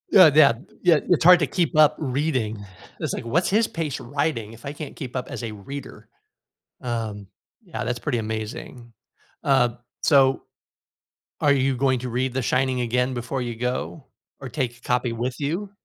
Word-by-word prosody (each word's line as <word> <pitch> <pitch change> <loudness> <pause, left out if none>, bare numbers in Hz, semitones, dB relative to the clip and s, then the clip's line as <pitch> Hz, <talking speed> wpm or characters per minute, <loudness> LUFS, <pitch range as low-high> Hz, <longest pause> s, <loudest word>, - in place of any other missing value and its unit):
Uh, 180 -6 +9
Yeah, 150 -5 +7 0.3
yeah, 170 -5 +5
it's 175 -2 +3
hard 180 0 +8
to 150 - +1
keep 170 +4 0
up 155 -1 +6
reading, 130 -7 -1 0.4
it's - - -2
like, - - -5
what's 165 +10 +1
his 220 +3 +3
pace 160 -5 -3
writing, 120 -5 -2
if 115 - -14
I 140 - -3
can't 150 0 -8
keep 130 -4 -7
up 125 - -3
as - - -6
a 110 - -4
reader? 130 +6 -9 0.7
Um, 110 -4 -4 0.4
yeah, - - -5
that's 120 - -2
pretty 125 -3 -1
amazing. 110 +2 -6 0.5
Uh, 135 -3 +4 0.3
so, 135 -3 +4 1.0
are 145 - +4
you 135 -1 +1
going 130 -1 +1
to 125 - -4
read 125 +1 -1
The 130 - 0
Shining 130 +2 +1
again 125 +2 0
before 125 +2 -3
you 120 -1 -4
go, 125 +4 -3 0.3
or 135 - -6
take 125 -4 -3
a - - -24
copy 125 -1 0
with 120 +2 -3
you? 175 +8 -2
130 Hz, 180 wpm, -24 LUFS, 120-145 Hz, 1.0 s, Uh